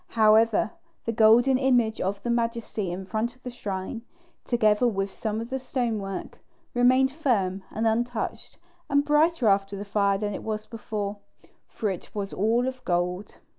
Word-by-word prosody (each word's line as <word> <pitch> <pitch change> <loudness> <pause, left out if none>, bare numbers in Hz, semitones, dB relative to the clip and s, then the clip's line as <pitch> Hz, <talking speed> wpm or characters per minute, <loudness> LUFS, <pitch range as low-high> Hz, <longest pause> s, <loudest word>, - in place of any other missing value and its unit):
However, 220 0 +4 0.3
the 230 - 0
golden 235 +4 +5
image 245 -5 +2
of 200 +1 -2
the 240 - -1
Majesty 230 -5 -1
in 185 +2 -5
front 220 +5 -2
of 255 - -28
the 250 - -5
shrine, 200 -1 -5 0.4
together 225 -1 +3
with 195 -3 -1
some 215 +2 -3
of 230 +2 -6
the 265 - -1
stonework, 225 -7 -3 0.3
remained 255 +2 +4
firm 210 -11 0
and 220 - -2
untouched, 230 +1 -2 0.3
and 285 0 +3
brighter 300 -3 +3
after 195 0 +2
the 200 - -6
fire 200 -1 +2
than 205 0 -2
it - - -5
was 215 -1 -4
before, 210 -2 -4 0.5
for 210 -3 -2
it 180 - -7
was 200 -1 -3
all 230 +5 +1
of 255 -1 -5
gold. 180 +2 -2
220 Hz, 165 wpm, -26 LUFS, 200-245 Hz, 0.5 s, golden